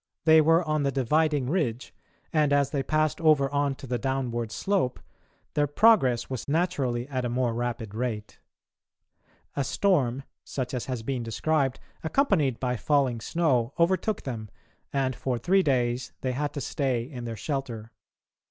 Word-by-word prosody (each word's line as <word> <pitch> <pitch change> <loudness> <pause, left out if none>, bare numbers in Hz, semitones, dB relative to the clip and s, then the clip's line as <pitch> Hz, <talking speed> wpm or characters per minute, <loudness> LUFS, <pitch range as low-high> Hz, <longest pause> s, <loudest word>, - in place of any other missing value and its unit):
They 160 -1 +7
were 165 +3 +4
on 155 -2 0
the 140 -1 +1
dividing 145 +1 +1
ridge 130 -7 -1 0.4
and, 150 -2 +3
as 140 -1 +3
they 140 - 0
passed 155 +3 0
over 150 -4 +4
on 140 -1 +1
to 135 - -10
the 125 -1 -2
downward 120 -3 -2
slope, 190 - 0 0.5
their 145 -1 +2
progress 145 - +4
was 130 -4 -5
naturally 140 -7 0
at 130 -3 -2
a 120 - -1
more 120 -1 0
rapid 115 -3 -3
rate. 110 -2 -4 1.2
A 140 - 0
storm, 135 - +1 0.2
such 130 -2 -4
as 125 +2 -3
has 125 -4 -3
been 130 0 -2
described, 135 +4 0 0.2
accompanied 155 - +2
by 125 -1 -1
falling 130 -1 +1
snow, 135 -4 +1
overtook 185 +5 +1
them, 110 -5 -5 0.4
and 135 -2 0
for 130 -2 -2
three 190 - +3
days 125 -5 0
they 130 - -1
had 145 +3 -2
to 140 - -4
stay 130 -4 -1
in 125 -2 -8
their 115 -1 -5
shelter. 120 -4 -4
135 Hz, 160 wpm, -27 LUFS, 120-155 Hz, 1.2 s, They